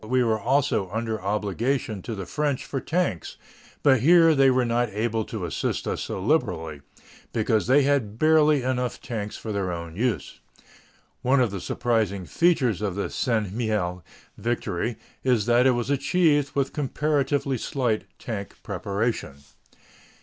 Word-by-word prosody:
We 125 Hz, +3 st, +2 dB
were 110 Hz, -2 st, +1 dB
also 125 Hz, -4 st, +1 dB
under 110 Hz, +1 st, -3 dB
obligation 105 Hz, +3 st, -1 dB
to 115 Hz, -, -5 dB
the 95 Hz, -2 st, -5 dB
French 145 Hz, -, -1 dB
for 135 Hz, -, -3 dB
tanks, 160 Hz, -, -2 dB, 0.5 s
but 135 Hz, -3 st, +5 dB
here 165 Hz, +5 st, +6 dB
they 135 Hz, -2 st, +5 dB
were 130 Hz, -1 st, +2 dB
not 120 Hz, 0 st, +1 dB
able 110 Hz, +2 st, -1 dB
to 105 Hz, -6 st, -5 dB
assist 85 Hz, -, -2 dB
us -, -, -2 dB
so -, -, -4 dB
liberally, 80 Hz, -3 st, 0 dB, 0.5 s
because 110 Hz, -1 st, +1 dB
they 140 Hz, +3 st, +5 dB
had 130 Hz, -7 st, 0 dB
barely 155 Hz, -1 st, +4 dB
enough 125 Hz, -1 st, -1 dB
tanks 105 Hz, -3 st, -5 dB
for 110 Hz, -, -6 dB
their 100 Hz, -3 st, -1 dB
own 85 Hz, -1 st, -6 dB
use. 105 Hz, -, -2 dB, 0.8 s
One 130 Hz, +2 st, +3 dB
of 120 Hz, -5 st, +2 dB
the 100 Hz, -2 st, -5 dB
surprising 105 Hz, -4 st, -1 dB
features 130 Hz, -, +2 dB
of 100 Hz, -4 st, -2 dB
the 100 Hz, -, -3 dB
St. 110 Hz, -6 st, -1 dB
Mihiel 105 Hz, -6 st, -1 dB, 0.4 s
victory 115 Hz, -2 st, -2 dB, 0.3 s
is 125 Hz, -6 st, +2 dB
that 120 Hz, +2 st, +4 dB
it -, -, +6 dB
was 120 Hz, +3 st, -2 dB
achieved 145 Hz, 0 st, +2 dB
with 140 Hz, -1 st, 0 dB
comparatively 145 Hz, -2 st, 0 dB
slight 120 Hz, -5 st, -1 dB
tank 100 Hz, -4 st, -6 dB
preparation. 100 Hz, -, -2 dB
120 Hz, 150 wpm, -25 LUFS, 105-135 Hz, 0.8 s, here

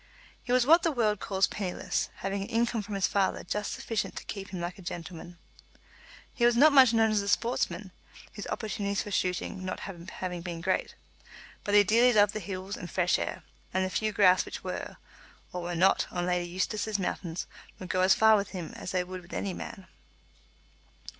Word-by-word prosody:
He 245 Hz, -, -5 dB
was 250 Hz, -1 st, +4 dB
what 330 Hz, +5 st, +7 dB
the 330 Hz, -, +1 dB
world 215 Hz, -7 st, +1 dB
calls 190 Hz, -1 st, +1 dB
penniless, 190 Hz, -4 st, -2 dB
having 195 Hz, +1 st, -3 dB
an 195 Hz, -, -4 dB
income 235 Hz, -1 st, 0 dB
from 205 Hz, 0 st, -6 dB
his 195 Hz, -2 st, +2 dB
father 195 Hz, +1 st, 0 dB
just 210 Hz, +3 st, -3 dB
sufficient 235 Hz, -4 st, -3 dB
to -, -, -6 dB
keep 195 Hz, -2 st, -6 dB
him 185 Hz, -, -5 dB
like 175 Hz, +2 st, -5 dB
a -, -, -10 dB
gentleman. 175 Hz, 0 st, -7 dB, 1.0 s
He 240 Hz, -, -2 dB
was 240 Hz, 0 st, +5 dB
not 300 Hz, +3 st, +7 dB
much 260 Hz, -4 st, +8 dB
known 225 Hz, -1 st, +3 dB
as 210 Hz, -1 st, +2 dB
a 200 Hz, -, -5 dB
sportsman, 210 Hz, -3 st, 0 dB, 0.4 s
his 205 Hz, -, -7 dB
opportunities 205 Hz, -3 st, -2 dB
for 205 Hz, -, -8 dB
shooting 185 Hz, 0 st, -1 dB
not 185 Hz, -, -4 dB
having 180 Hz, -1 st, -6 dB
been 170 Hz, -1 st, -5 dB
great; 185 Hz, +3 st, -1 dB, 0.7 s
but 205 Hz, -, 0 dB
he 205 Hz, -, +8 dB
dearly 235 Hz, +5 st, +4 dB
loved 205 Hz, -1 st, +5 dB
the 215 Hz, -, -3 dB
hills 190 Hz, +1 st, -5 dB
and 175 Hz, -, -7 dB
fresh 180 Hz, -1 st, +2 dB
air, -, -, -4 dB, 0.3 s
and 185 Hz, 0 st, +2 dB
the 185 Hz, -, -4 dB
few 215 Hz, +2 st, 0 dB
grouse 185 Hz, -3 st, +5 dB
which -, -, -8 dB
were, -, -, -5 dB, 0.6 s
or 180 Hz, -, -3 dB
were 175 Hz, 0 st, -3 dB
not, 185 Hz, +3 st, +3 dB
on 175 Hz, -1 st, -2 dB
Lady 180 Hz, -1 st, 0 dB
Eustace's 205 Hz, +4 st, -1 dB
mountains 180 Hz, -2 st, -3 dB, 0.3 s
would 185 Hz, -, -9 dB
go 185 Hz, -, +1 dB
as 185 Hz, +1 st, +5 dB
far 220 Hz, -2 st, +6 dB
with 200 Hz, -1 st, 0 dB
him 175 Hz, -4 st, -6 dB
as -, -, -7 dB
they 180 Hz, -1 st, +1 dB
would 185 Hz, 0 st, -7 dB
with 175 Hz, -, -15 dB
any 195 Hz, -2 st, -2 dB
man. 190 Hz, +1 st, -8 dB
195 Hz, 200 wpm, -29 LUFS, 180-215 Hz, 1.0 s, much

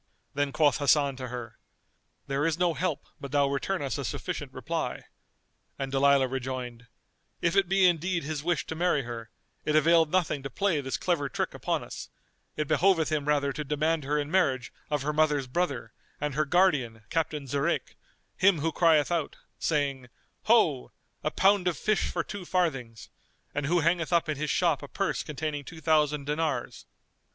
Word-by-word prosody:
Then 145 Hz, 0 st, 0 dB
quoth 150 Hz, -1 st, +3 dB
Hasan 140 Hz, -1 st, +3 dB
to 130 Hz, -1 st, -5 dB
her, 120 Hz, -2 st, -7 dB, 0.7 s
"There 140 Hz, +1 st, -1 dB
is 165 Hz, -1 st, +1 dB
no 175 Hz, -1 st, +2 dB
help 180 Hz, -3 st, -2 dB
but 140 Hz, -, -7 dB
thou 145 Hz, -1 st, +3 dB
return 145 Hz, +5 st, -1 dB
us 140 Hz, +1 st, -2 dB
a -, -, -2 dB
sufficient 105 Hz, -, -4 dB
reply"; -, -, -3 dB, 0.7 s
and 135 Hz, -1 st, -4 dB
Dalilah 140 Hz, 0 st, +4 dB
rejoined, 125 Hz, -2 st, -5 dB, 0.5 s
"If 170 Hz, +2 st, +1 dB
it 195 Hz, -2 st, +3 dB
be 195 Hz, 0 st, +4 dB
indeed 175 Hz, 0 st, +2 dB
his 150 Hz, 0 st, -4 dB
wish 175 Hz, +1 st, 0 dB
to -, -, -5 dB
marry 170 Hz, -4 st, +1 dB
her, 115 Hz, -2 st, -7 dB, 0.3 s
it 150 Hz, -, 0 dB
availed 165 Hz, 0 st, +5 dB
nothing 170 Hz, -6 st, +1 dB
to 135 Hz, -, -5 dB
play 190 Hz, -5 st, 0 dB
this 130 Hz, -4 st, -3 dB
clever 160 Hz, -6 st, 0 dB
trick -, -, -2 dB
upon -, -, -2 dB
us: -, -, -8 dB, 0.5 s
it 150 Hz, -1 st, -1 dB
behoveth 160 Hz, +1 st, +3 dB
him 150 Hz, -2 st, 0 dB
rather 140 Hz, -1 st, +2 dB
to 150 Hz, -, -4 dB
demand 150 Hz, +2 st, 0 dB
her 150 Hz, +2 st, 0 dB
in 145 Hz, 0 st, -2 dB
marriage 135 Hz, -10 st, +1 dB, 0.2 s
of 145 Hz, -2 st, -1 dB
her 150 Hz, +2 st, -1 dB
mother's 150 Hz, -3 st, +2 dB
brother 130 Hz, -5 st, -2 dB, 0.3 s
and 150 Hz, -1 st, -2 dB
her 155 Hz, +3 st, +1 dB
guardian, 140 Hz, -, +2 dB
Captain 155 Hz, -3 st, -1 dB
Zurayk, 140 Hz, +5 st, -1 dB, 0.4 s
him 190 Hz, -2 st, +4 dB
who 165 Hz, +2 st, +1 dB
crieth 160 Hz, -2 st, +3 dB
out, 165 Hz, -4 st, -1 dB, 0.2 s
saying, 140 Hz, -5 st, -1 dB, 0.4 s
'Ho! 60 Hz, 0 st, +3 dB, 0.3 s
a -, -, +1 dB
pound 195 Hz, -1 st, +3 dB
of 170 Hz, -5 st, 0 dB
fish 215 Hz, -1 st, +1 dB
for -, -, -1 dB
two 205 Hz, -2 st, -7 dB
farthings!' 135 Hz, -, -2 dB, 0.4 s
and 145 Hz, 0 st, -2 dB
who 175 Hz, +2 st, +2 dB
hangeth 170 Hz, +1 st, +1 dB
up 170 Hz, -2 st, +3 dB
in 155 Hz, -2 st, -2 dB
his 150 Hz, +1 st, -2 dB
shop 170 Hz, -4 st, +2 dB
a 145 Hz, -, -7 dB
purse 195 Hz, +6 st, -1 dB
containing 150 Hz, -1 st, -4 dB
two 160 Hz, +4 st, -10 dB
thousand 150 Hz, -2 st, +2 dB
dinars." 150 Hz, 0 st, -2 dB
150 Hz, 180 wpm, -28 LUFS, 140-170 Hz, 0.7 s, availed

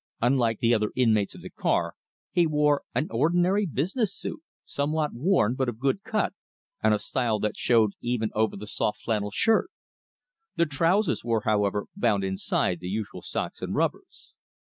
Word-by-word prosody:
Unlike 120 Hz, -2 st, +2 dB
the 115 Hz, 0 st, +4 dB
other 105 Hz, -2 st, +1 dB
inmates 110 Hz, -5 st, +2 dB
of -, -, -11 dB
the -, -, -8 dB
car, -, -, 0 dB, 0.4 s
he 175 Hz, -3 st, +3 dB
wore 150 Hz, -1 st, +2 dB
an 155 Hz, -, +1 dB
ordinary 175 Hz, -, +2 dB
business 190 Hz, -, -1 dB
suit, -, -, -5 dB, 0.2 s
somewhat 150 Hz, +1 st, -1 dB
worn, 125 Hz, -, +2 dB
but 130 Hz, -1 st, 0 dB
of 115 Hz, -, -6 dB
good 135 Hz, -, 0 dB
cut, 215 Hz, 0 st, -1 dB, 0.5 s
and 110 Hz, -, +3 dB
a 105 Hz, -, +4 dB
style 115 Hz, 0 st, -1 dB
that 105 Hz, -, -1 dB
showed 115 Hz, -4 st, +3 dB
even 120 Hz, -2 st, -1 dB
over 110 Hz, -1 st, 0 dB
the 105 Hz, -, -7 dB
soft 105 Hz, 0 st, -2 dB
flannel 105 Hz, -3 st, -1 dB
shirt. 220 Hz, -, +2 dB, 0.9 s
The 170 Hz, -, +3 dB
trousers 165 Hz, +7 st, +1 dB
were, 115 Hz, -2 st, +1 dB
however, 105 Hz, -1 st, +1 dB
bound 105 Hz, -, +1 dB
inside 95 Hz, -2 st, 0 dB
the 90 Hz, -, -7 dB
usual 105 Hz, +2 st, -4 dB
socks -, -, -4 dB
and -, -, -3 dB
rubbers. -, -, -3 dB
120 Hz, 165 wpm, -26 LUFS, 110-160 Hz, 0.9 s, the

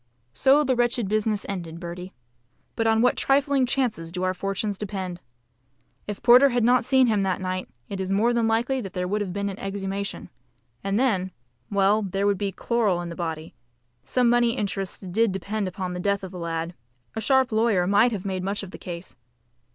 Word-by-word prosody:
So 275 Hz, -, +4 dB
the 260 Hz, -2 st, +1 dB
wretched 240 Hz, -2 st, +1 dB
business 215 Hz, 0 st, 0 dB
ended, 170 Hz, -4 st, -5 dB
Bertie. 180 Hz, +1 st, -7 dB, 0.6 s
But 225 Hz, -, +1 dB
on 225 Hz, +1 st, +3 dB
what 250 Hz, -, +4 dB
trifling 275 Hz, -1 st, +2 dB
chances 225 Hz, -11 st, -1 dB
do 180 Hz, +1 st, -3 dB
our 185 Hz, 0 st, +1 dB
fortunes 195 Hz, +2 st, -2 dB
depend! 190 Hz, -4 st, -5 dB, 0.9 s
If 205 Hz, -1 st, -6 dB
Porter 250 Hz, +3 st, +8 dB
had 245 Hz, -2 st, +1 dB
not 245 Hz, +1 st, +4 dB
seen 260 Hz, 0 st, +4 dB
him 215 Hz, -4 st, +2 dB
that 190 Hz, -2 st, 0 dB
night, 185 Hz, 0 st, -3 dB, 0.2 s
it 195 Hz, -1 st, -4 dB
is 190 Hz, 0 st, -3 dB
more 220 Hz, +5 st, +3 dB
than 235 Hz, -1 st, +2 dB
likely 240 Hz, +4 st, +1 dB
that 195 Hz, -4 st, -7 dB
there 180 Hz, 0 st, -2 dB
would 210 Hz, +3 st, -1 dB
have 195 Hz, -3 st, -3 dB
been 200 Hz, +2 st, -2 dB
an 195 Hz, -1 st, -5 dB
exhumation. 195 Hz, 0 st, -4 dB, 0.5 s
And 195 Hz, +2 st, 0 dB
then, 195 Hz, -8 st, +1 dB, 0.4 s
well, 200 Hz, +1 st, +3 dB
there 195 Hz, 0 st, -1 dB
would 200 Hz, -2 st, +2 dB
be 200 Hz, -1 st, -1 dB
chloral 210 Hz, -2 st, 0 dB
in 175 Hz, -1 st, -5 dB
the 170 Hz, -, -7 dB
body; 160 Hz, -2 st, -5 dB, 0.5 s
some 250 Hz, -1 st, +1 dB
money 240 Hz, 0 st, +3 dB
interests 195 Hz, -3 st, -2 dB
DID 205 Hz, +4 st, +1 dB
depend 200 Hz, +2 st, -2 dB
upon 185 Hz, 0 st, -4 dB
the 180 Hz, -, -4 dB
death 200 Hz, +1 st, 0 dB
of 190 Hz, -, -6 dB
the 180 Hz, -, -8 dB
lad 165 Hz, 0 st, -3 dB, 0.4 s
a 220 Hz, -, -2 dB
sharp 265 Hz, +2 st, +3 dB
lawyer 220 Hz, -5 st, +2 dB
might 205 Hz, +6 st, +4 dB
have 205 Hz, -4 st, -4 dB
made 190 Hz, -1 st, -2 dB
much 200 Hz, +2 st, -2 dB
of 190 Hz, -, -8 dB
the -, -, -10 dB
case. 170 Hz, 0 st, -8 dB
200 Hz, 200 wpm, -25 LUFS, 185-230 Hz, 0.9 s, Porter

